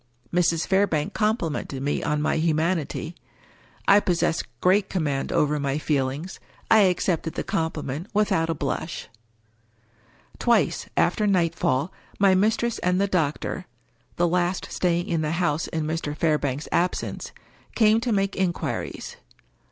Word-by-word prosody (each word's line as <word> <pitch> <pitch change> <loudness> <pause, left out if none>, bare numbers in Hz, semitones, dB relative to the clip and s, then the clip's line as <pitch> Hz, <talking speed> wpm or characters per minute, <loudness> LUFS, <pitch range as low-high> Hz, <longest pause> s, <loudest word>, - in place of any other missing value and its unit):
Mrs. 170 -2 +2
Fairbank 190 -6 +1
complimented 170 - -1
me 145 - 0
on 150 0 0
my 155 - +1
humanity. 160 0 0 0.7
I 200 - +7
pos 180 -4 0
sess 165 - +1 0.2
great 190 +2 +3
command 145 -7 -1
over 150 0 +2
my 140 0 -1
feelings. 145 +3 -2 0.3
I 220 - +8
accepted 180 -4 +1
the - - -2
compliment 160 0 -3
without 185 -6 +1
a 165 - 0
blush. 145 +3 -4 1.3
Twice, - - +2
after 210 +5 +2
nightfall, 165 -5 +1 0.2
my 195 -1 +5
mistress 220 +4 +1
and 180 +1 +1
the 200 - +3
doctor 165 -7 -1 0.5
(the 175 - +2
last 180 +1 0
staying 175 -1 0
in 165 -2 0
the 155 0 -1
house 170 -3 0
in 160 -2 -2
Mr. 155 -1 -3
Fairbank's 150 -3 0
absence) 180 +1 -1 0.4
came 220 -1 +5
to 240 0 -1
make 195 -1 +1
inquiries. 190 - -3
170 Hz, 135 wpm, -25 LUFS, 150-190 Hz, 1.3 s, I